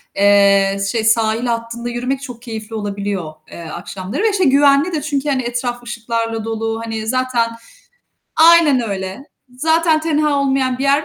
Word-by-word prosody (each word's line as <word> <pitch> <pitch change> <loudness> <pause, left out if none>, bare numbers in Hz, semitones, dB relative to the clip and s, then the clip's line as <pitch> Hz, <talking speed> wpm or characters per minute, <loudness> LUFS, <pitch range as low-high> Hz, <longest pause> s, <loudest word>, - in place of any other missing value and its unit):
eee, 200 -1 +4
şey, 225 -2 -1
sahil 225 +1 +2
hattında 235 0 -3
yürümek 250 +3 -3
çok 245 -4 -9
keyifli 225 -2 -7
olabiliyor, 200 -5 -4 0.2
eee, 170 - -9
akşamları 185 - -5
ve, 450 - +4
işte, 385 -2 0
güvenli 280 +3 +4
de 310 - -2
çünkü, 290 -1 -2
hani, 265 -2 +1
etraf 240 0 -3
ışıklarla 230 -1 -3
dolu, 225 0 -3
hani 225 -1 -5
zaten 255 -1 0 0.9
aynen 320 -5 +6
öyle, 190 +6 -5 0.3
zaten 320 +2 +2
tenha 300 -2 +1
olmayan 265 -2 0
bir - - -3
yer 280 +2 +2
240 Hz, 150 wpm, -18 LUFS, 220-280 Hz, 0.9 s, aynen